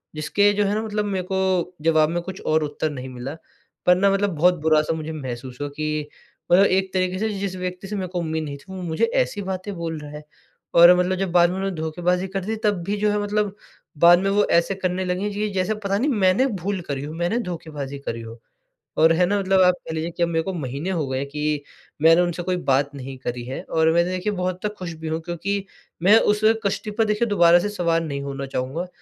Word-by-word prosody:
जिसके 180 +7 +2
जो 205 0 +1
है 200 - 0
ना, 215 - 0
मतलब 210 -1 -2
मेरे 190 -3 -2
को 185 -2 0
जवाब 155 -1 +3
में 175 +1 -1
कुछ 190 +1 -7
और 155 0 +2
उत्तर 150 +1 -2
नहीं 130 -2 -7
मिला। 125 +2 -6 0.5
पर 180 - +6
ना 195 +2 +3
मतलब 195 -2 0
बहुत 180 +4 +4
बुरा-सा 155 0 +3
मुझे 160 0 -5
महसूस 130 -4 -6
हुआ 145 - -2
कि 155 -1 -2 0.4
मतलब 190 +3 +7
एक 190 0 +1
तरीके 185 0 0
से 220 +1 0
जिस 195 -1 -3
व्यक्ति 180 +1 -5
से 210 - -4
मेरे 190 -2 -3
को 180 0 -4
उम्मीद 160 -1 -2
नहीं 145 -2 -6
थी, 140 - -19
वो 190 -1 -6
मुझे 160 -2 +1 0.2
ऐसी 205 - -3
बातें 190 +1 -4
बोल 165 -2 -4
रहा 150 0 -9
है। 150 0 -9 0.5
और 170 +1 +8
मतलब 180 +1 +1
जब 190 -2 -2
बाद 175 -1 +5
में 185 - -3
उन्होंने 195 -1 -2
धोखेबाज़ी 175 +4 -1
कर 190 -1 -4
दी, 220 +2 -2
तब 205 -5 +1
भी 200 +4 -2
जो 210 0 +1
है 210 - 0
मतलब 205 -1 -1 0.4
बाद 175 +3 +7
में 195 +1 0
वो 205 +1 +3
ऐसे 170 +3 +3
करने 185 0 -2
लगी, 185 +3 -1
जी 210 +1 -2
जैसे 190 +3 0
पता 200 -2 -1
नहीं 265 +8 +1 0.2
मैंने 185 +9 +4 0.2
भूल 195 -1 -1
करी 140 -1 -2
हो, 150 +2 -6
मैंने 175 +8 -1
धोखेबाज़ी 145 -5 -6
करी 115 -4 -5
हो। 115 +1 -10 0.6
और 160 +1 +6
है 180 +2 +3
ना 205 +3 +1
मतलब 190 -1 +3
आप 180 0 +6
कह 160 - -4
लीजिए 160 +2 -3
कि 170 - +2
अब 170 - +1
मेरे 165 -1 0
को 190 - -4
महीने 145 +1 -4
हो 170 -6 -1
गए 130 +1 -2
कि, 150 +1 -2 0.4
मैंने 165 +2 +6
उनसे 175 0 -1
कोई 180 0 -1
बात 140 +2 +2
नहीं 135 -1 -7
करी 120 -1 -5
है 130 +2 -5
और 160 0 +2
मैं 170 - +4
देखिए 185 +3 -2
बहुत 185 -1 -1
हद 210 +3 -3
तक 210 - -13
खुश 175 -3 -5
भी 160 - -5
हूँ, 160 +1 -1
क्योंकि 190 +4 -3 0.4
मैं 205 +5 +7
उस 210 -1 +1 0.2
कश्ती 205 +2 -1
पर 220 +1 +1
देखिए 210 +2 +1
दोबारा 175 -4 +5
से 205 - -2
सवार 170 -5 0
नहीं 140 -3 -4
होना 140 0 -5
चाहूँगा, 135 +7 -3
175 Hz, 240 wpm, -23 LUFS, 155-195 Hz, 0.6 s, और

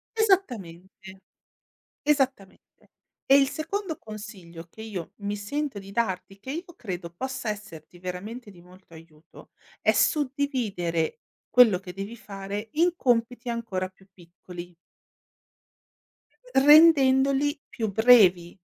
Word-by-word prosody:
Esattamente. 195 - -1 0.8
Esattamente. 270 -9 -1 0.6
E 275 - +7
il 275 -1 +3
secondo 325 +3 -4
consiglio 200 -6 -10
che 220 - -12
io 200 -7 -6
mi 205 0 -3
sento 265 +4 -4
di 195 0 -11
darti, 195 -3 -2
che 260 - -8
io 345 +4 -6
credo 180 -6 -6
possa 260 +7 -5
esserti 190 -6 -8
veramente 200 +6 -7
di 180 -3 -16
molto 180 0 -18
aiuto, 160 0 -16 0.3
è - - +3
suddividere 250 - 0 0.3
quello 225 -5 +6
che 180 -1 -10
devi 200 +5 -7
fare 200 0 -7
in 340 +3 +2
compiti 240 -1 0
ancora 225 -6 -3
più 190 +1 -24
piccoli. 175 0 -12 1.8
Rendendoli 280 -1 +5
più 220 -3 -4
brevi, 200 -6 +5
210 Hz, 110 wpm, -26 LUFS, 185-265 Hz, 1.8 s, E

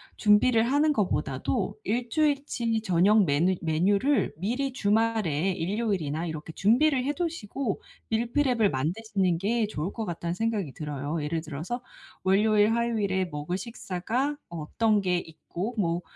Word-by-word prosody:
준비를 225 +2 +4
하는 290 +5 +3
것보다도 210 -8 -1
1 240 +1 -1
주일치 280 -6 0
저녁 200 +1 +4
메뉴 165 +5 +2
메뉴를 195 - +2
미리 245 - -1
주말에 210 - +1
일요일이나 180 -4 -1
이렇게 160 -1 -6
준비를 250 - +3
해 285 +3 0
두시고 275 - -3 0.3
밀프렙을 235 0 +2
만드시는 180 +5 0
게 215 +4 0
좋을 180 -2 -3
것 225 - -4
같다.‘는 170 -2 -3
생각이 210 -5 -1
들어요. 150 +1 -4
예를 160 +2 -2
들어서 165 - -5 0.4
월요일 210 +3 +4
화요일에 215 -5 0
먹을 160 +1 -4
식사가 235 +6 -3
어떤 205 +7 0
게 180 -2 +1
있고 175 +7 -5
뭐 170 -3 0
205 Hz, 310 characters per minute, -27 LUFS, 170-235 Hz, 0.4 s, 준비를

